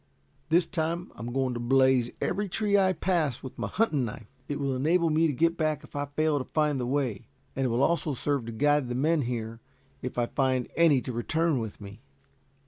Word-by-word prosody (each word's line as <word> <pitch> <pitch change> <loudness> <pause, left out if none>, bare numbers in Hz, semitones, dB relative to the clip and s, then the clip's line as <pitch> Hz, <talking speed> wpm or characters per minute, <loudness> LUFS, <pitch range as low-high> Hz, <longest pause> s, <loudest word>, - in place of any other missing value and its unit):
"This 170 +2 +4
time 170 +1 -3
I - - -18
am 115 +2 -5
going 130 0 0
to 120 - -4
blaze 130 0 +3
every 205 -1 -1
tree 205 +2 +1
I 190 -2 +4
pass, 165 -7 0
with 130 - -9
my - - -1
hunting 170 - +1
knife. 115 -1 -6 0.2
It 145 - -3
will 140 -2 -1
enable 165 +5 +2
me 160 +2 +3
to - - 0
get 165 +5 +1
back 155 -1 0
if 150 - -15
I 145 0 -2
fail 150 +1 +1
to - - -2
find 150 -1 0
the 125 - -2
way, 130 -6 -1 0.3
and 135 -1 0
it - - -1
also 140 +8 +1
will 140 - -1
serve 140 -1 -1
to - - -4
guide 145 +2 +2
the 120 - -2
men 155 +4 +2
here, 115 -2 -4 0.4
if 125 - -5
I 120 - +2
find 130 0 0
any 160 -6 +4
to 125 - -5
return 160 +5 0
with 110 -3 -6
me." 100 +2 -11
140 Hz, 220 wpm, -28 LUFS, 125-160 Hz, 0.4 s, This